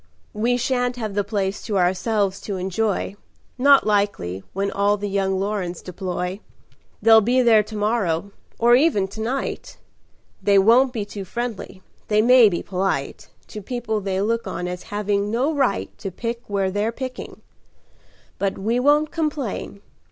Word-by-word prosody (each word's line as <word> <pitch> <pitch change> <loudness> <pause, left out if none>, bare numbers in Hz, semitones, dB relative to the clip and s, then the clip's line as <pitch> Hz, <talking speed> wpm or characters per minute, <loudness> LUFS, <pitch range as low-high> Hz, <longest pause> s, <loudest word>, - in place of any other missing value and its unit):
"We 235 +3 +1
sha'n't 245 0 0
have 220 -4 -4
the 205 0 0
place 200 -1 -2
to 210 -3 -1
ourselves 195 +2 0
to 200 -2 -4
enjoy 195 +2 -1 0.4
Not 280 +1 +6
likely, 200 - 0
when 200 +1 -2
all 200 +1 +2
the 205 0 -4
young 195 -1 0
Lorens 195 -4 -2
deploy. 180 +1 -4 0.6
They'll 225 -1 +7
be 250 +4 +2
there 225 -3 +6
to 215 +1 -9
morrow, 205 -4 0 0.3
or 235 +1 +4
even 250 -9 +3
to 220 +3 -7
night. 255 +5 -4 0.6
They 200 -1 +4
won't 235 +7 +5
be 220 -5 -3
too 205 -1 -7
friendly 215 -2 -5 0.2
they 215 0 +3
may 245 -2 +7
be 175 - -3
polite 180 -7 -2 0.2
To 210 - -7
people 220 -1 -3
they 190 -1 -2
look 230 +3 -1
on 180 - -4
as 180 0 -5
having 205 0 -1
no 255 +8 0
right 275 -9 0
To 200 -2 -4
pick 230 +5 -4
where 195 -2 0
they're 205 +3 0
picking. 255 +1 -7 1.0
But 195 -1 -1
we 225 +5 0
won't 295 +3 +3
complain. 290 - -3
210 Hz, 160 wpm, -22 LUFS, 195-235 Hz, 1.0 s, They'll